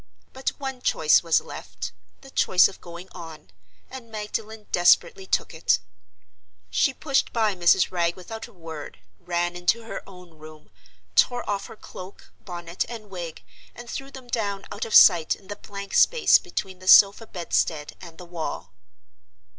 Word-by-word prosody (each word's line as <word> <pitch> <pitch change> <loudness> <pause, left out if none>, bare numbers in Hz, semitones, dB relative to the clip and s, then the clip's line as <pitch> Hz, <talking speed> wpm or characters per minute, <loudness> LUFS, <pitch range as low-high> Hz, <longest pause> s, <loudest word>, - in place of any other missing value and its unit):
But 265 0 -2
one 265 -2 -5
choice 155 -9 +4
was 165 -2 +2
left—the 270 - -10
choice 185 -7 +5
of 195 - -13
going 170 +1 -10
on—and 150 - -13
Magdalen 215 0 -5
desperately 180 +2 +3
took - - 0
it. 160 - +2 0.9
She 270 - +3
pushed 270 0 0
by 220 -3 +1
Mrs. 180 0 +3
Wragge 170 -1 0
without 220 +5 -8
a - - -18
word, 165 -4 -9 0.2
ran 175 0 -2
into 175 +6 0
her 225 - -6
own 180 -4 -15
room, 155 -6 -14 0.4
tore 245 -1 +3
off 200 -1 -2
her - - -11
cloak, 185 -2 -12
bonnet 175 -1 -5
and 215 -4 -9
wig, 170 -4 -7 0.3
and 240 0 -10
threw 270 +3 -6
them 265 -2 -11
down 205 -4 -2
out 205 - -4
of 225 - -1
sight 170 -5 +7
in 195 - -21
the 205 - -4
blank 200 -1 -9
space 485 -2 +5
between 190 - -5
the 185 - -12
sofa 200 +4 +7
bedstead 165 -4 -2
and 170 -3 -12
the 180 - -10
wall. 160 - -6
185 Hz, 155 wpm, -25 LUFS, 170-220 Hz, 0.9 s, sight